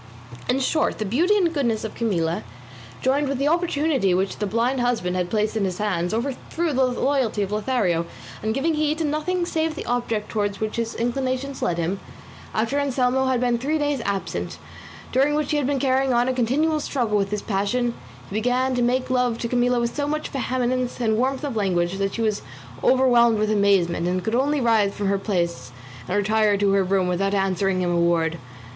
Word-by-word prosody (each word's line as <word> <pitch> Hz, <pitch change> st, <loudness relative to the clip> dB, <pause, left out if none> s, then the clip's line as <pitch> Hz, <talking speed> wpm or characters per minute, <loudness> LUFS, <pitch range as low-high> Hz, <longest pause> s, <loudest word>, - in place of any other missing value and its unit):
In 255 Hz, +2 st, +2 dB
short 310 Hz, +4 st, +1 dB
the 215 Hz, -, -2 dB
beauty 335 Hz, -, +2 dB
and 345 Hz, -4 st, +2 dB
goodness 235 Hz, -8 st, 0 dB
of 220 Hz, -, -5 dB
Camilla, 175 Hz, -8 st, -1 dB, 0.6 s
joined 275 Hz, +2 st, +2 dB
with 275 Hz, -, -1 dB
the 275 Hz, +2 st, 0 dB
opportunity 305 Hz, -, +1 dB
which 190 Hz, +1 st, -1 dB
the 210 Hz, -, -1 dB
blind 235 Hz, +5 st, 0 dB
husband 225 Hz, -7 st, 0 dB
had 180 Hz, -1 st, -1 dB
placed 215 Hz, +1 st, 0 dB
in 215 Hz, -, 0 dB
his 185 Hz, -2 st, -2 dB
hands, 185 Hz, -5 st, -1 dB
overthrew 280 Hz, +7 st, -2 dB
the 260 Hz, 0 st, +3 dB
loyalty 250 Hz, -3 st, 0 dB
of 195 Hz, -, -4 dB
Lothario; 210 Hz, -7 st, 0 dB, 0.3 s
and 220 Hz, +1 st, -1 dB
giving 320 Hz, +5 st, +1 dB
heed 305 Hz, 0 st, 0 dB
to 325 Hz, -, -1 dB
nothing 315 Hz, +4 st, -1 dB
save 320 Hz, -2 st, -1 dB
the -, -, -6 dB
object 230 Hz, -3 st, -1 dB
towards 205 Hz, -2 st, -1 dB
which 215 Hz, +1 st, -3 dB
his 230 Hz, -1 st, -2 dB
inclinations 260 Hz, +3 st, -2 dB
led 170 Hz, -, 0 dB
him, 175 Hz, +4 st, -1 dB, 0.5 s
after 230 Hz, +6 st, 0 dB
Anselmo 265 Hz, -1 st, +1 dB
had 260 Hz, -2 st, +1 dB
been 240 Hz, -1 st, +1 dB
three 295 Hz, +5 st, 0 dB
days 290 Hz, -3 st, 0 dB
absent, 200 Hz, -2 st, -3 dB, 0.5 s
during 275 Hz, +3 st, +2 dB
which 300 Hz, +1 st, -1 dB
he 300 Hz, -, +2 dB
had 285 Hz, -3 st, 0 dB
been 285 Hz, -1 st, +1 dB
carrying 265 Hz, -1 st, +2 dB
on 240 Hz, +1 st, +2 dB
a 260 Hz, -, +1 dB
continual 285 Hz, +6 st, +1 dB
struggle 245 Hz, -7 st, -1 dB
with 200 Hz, -1 st, +1 dB
his 210 Hz, 0 st, -3 dB
passion, 230 Hz, +4 st, 0 dB, 0.3 s
he -, -, -10 dB
began 250 Hz, +4 st, +1 dB
to 250 Hz, -, 0 dB
make 255 Hz, +2 st, +1 dB
love 250 Hz, -2 st, +1 dB
to 235 Hz, -, -3 dB
Camilla 245 Hz, 0 st, +2 dB
with 235 Hz, 0 st, -2 dB
so 290 Hz, -1 st, -1 dB
much 305 Hz, +1 st, -2 dB
vehemence 255 Hz, -2 st, -1 dB
and 220 Hz, -3 st, +1 dB
warmth 265 Hz, +4 st, 0 dB
of 280 Hz, -5 st, -3 dB
language 185 Hz, -3 st, 0 dB
that 195 Hz, 0 st, -1 dB
she 230 Hz, -, -1 dB
was 215 Hz, -2 st, 0 dB, 0.4 s
overwhelmed 240 Hz, -3 st, +4 dB
with 215 Hz, 0 st, +1 dB
amazement, 195 Hz, -5 st, +2 dB
and 180 Hz, 0 st, -1 dB
could 220 Hz, -, -2 dB
only 280 Hz, +4 st, +2 dB
rise 220 Hz, -5 st, +2 dB
from 205 Hz, -, -3 dB
her 200 Hz, 0 st, +1 dB
place 170 Hz, -, -2 dB, 0.4 s
and 185 Hz, -, 0 dB
retire 210 Hz, 0 st, +2 dB
to 200 Hz, 0 st, +2 dB
her 195 Hz, 0 st, +3 dB
room 190 Hz, 0 st, +1 dB
without 195 Hz, +3 st, 0 dB
answering 195 Hz, -1 st, +1 dB
him 175 Hz, -, 0 dB
a 170 Hz, -, +1 dB
word. 165 Hz, -1 st, +1 dB
235 Hz, 205 wpm, -23 LUFS, 200-265 Hz, 0.6 s, overwhelmed